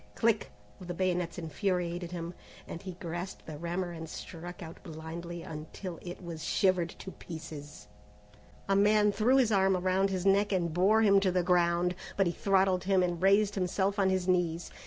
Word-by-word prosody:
click! 225 -2 +1 0.3
of 175 -2 -6
bayonets 180 -3 0
infuriated 175 0 -2
him, 170 -1 -5 0.3
and 165 - -7
he 185 -2 -6
grasped 175 +1 -6
the 155 - -7
rammer 175 +2 -2
and 165 -1 -7
struck 175 +2 -8
out 165 0 -10
blindly 165 +2 -7
until 160 +3 -7
it 180 +1 -8
was 165 -3 -6
shivered 185 0 +2
to 190 - -9
pieces. 155 - -9 0.8
A 195 - +2
man 210 +1 +4
threw 235 +6 +3
his 245 -4 +3
arm 190 -2 +3
around 185 +2 +1
his 190 -1 -2
neck 200 +1 +4
and 170 -4 0
bore 205 +6 +4
him 200 -2 +6
to 195 -1 +1
the 180 0 +1
ground, 175 0 +2 0.2
but 195 - +4
he 170 - 0
throttled 190 -1 +2
him 190 -1 +3
and 175 -2 -1
raised 200 +2 +4
himself 195 +2 0
on 190 -1 +4
his 185 -1 0
knees. 175 -2 0
180 Hz, 180 wpm, -30 LUFS, 170-195 Hz, 0.8 s, him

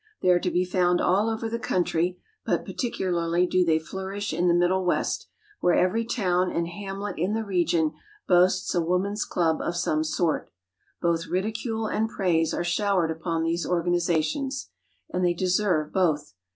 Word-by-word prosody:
They - - +4
are 180 -1 +5
to 180 - -1
be 180 +1 +1
found 180 -1 +2
all 200 +5 +2
over 225 0 -2
the 230 +1 -3
country, 180 -5 0 0.3
but - - -1
particularly 175 -7 0
do 180 0 +2
they 160 -2 +3
flourish 190 +4 -5
in 175 +3 +1
the 170 - +4
Middle 180 +2 +2
West, 180 - 0 0.3
where 175 - +3
every 220 +6 +2
town 185 -6 +1
and 170 0 -1
hamlet 195 +2 -5
in 190 +6 0
the 225 - -1
region 170 -5 +1 0.4
boasts 185 +1 +3
a 175 - +2
woman's 185 +5 0
club 165 -3 0
of 175 - -2
some 155 -3 +1
sort. 160 +1 -1 0.5
Both 170 0 +1
ridicule 220 +4 -2
and 220 +1 0
praise 170 -6 +1
are - - -1
showered 175 -1 +1
upon 165 0 -2
these 165 +1 0
organizations; 175 - 0 0.4
and 180 - 0
they 175 -1 +2
deserve 180 -4 +1
both. 155 - +1
180 Hz, 165 wpm, -26 LUFS, 170-195 Hz, 0.5 s, are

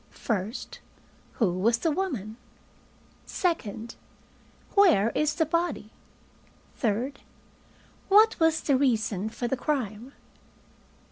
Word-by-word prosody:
1st 215 +1 -4 0.5
Who 205 -8 +1
was 230 +4 +3
the 325 +6 0
woman? 255 - -3 0.9
2nd 235 - -2 0.8
Where 315 - +5
is 305 0 0
the 320 - +2
body? 335 -9 -2 0.9
3rd 245 +5 -1 0.9
What 430 +3 +5
was 325 -1 +3
the 280 - +2
reason 220 -6 0
for 240 +2 -4
the 265 - 0
crime? 250 -3 -3
250 Hz, 95 wpm, -27 LUFS, 215-320 Hz, 0.9 s, Where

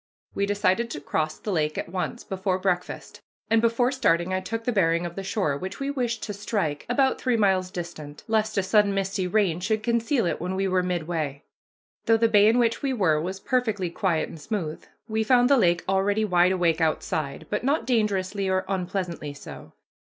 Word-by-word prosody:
We 200 0 0
decided 205 +3 +1
to 145 - -5
cross 155 +2 -2
the 210 - -5
lake 155 -4 0
at - - -3
once, 185 +7 -4
before 190 -1 -1
breakfast; 180 -1 -3 0.3
and 225 0 +5
before 235 +2 +2
starting 185 -9 +1
I 185 - +1
took 225 +5 -4
the 245 - 0
bearing 170 -5 +2
of 170 - -5
the 195 - -4
shore 190 -7 -1
which 185 +7 -6
we 275 0 -2
wished 245 -5 -2
to 210 - -4
strike, 195 -7 -2
about 265 +2 +2
three 250 -3 +1
miles 190 -3 +2
distant, 170 -5 -7
lest 220 -1 0
a 195 - +3
sudden 200 +1 +3
misty 195 -1 -1
rain 185 -4 +1
should 215 +4 -1
conceal 235 0 +1
it 170 - -2
when 180 +2 -2
we 195 0 0
were 185 -1 +2
midway. 160 -5 -3 0.6
Though 225 - +5
the 230 +1 +3
bay 210 -2 +5
in 225 +2 +4
which 230 -2 +2
we 275 -2 0
were 165 -10 +2
was 190 +3 -4
perfectly 220 -8 -1
quiet 170 -2 0
and 160 - -11
smooth, 170 -6 -4 0.2
we 220 0 0
found 245 +3 +4
the - - +8
lake 175 -6 +3
already 200 +3 +1
wide 180 -2 +4
awake 170 -3 +1
outside, 155 -2 -1
but 210 - -1
not 280 +4 +1
dangerously 200 -4 0
or 185 0 0
unpleasantly 180 -5 -3
so. - - -11
195 Hz, 200 wpm, -25 LUFS, 175-220 Hz, 0.6 s, the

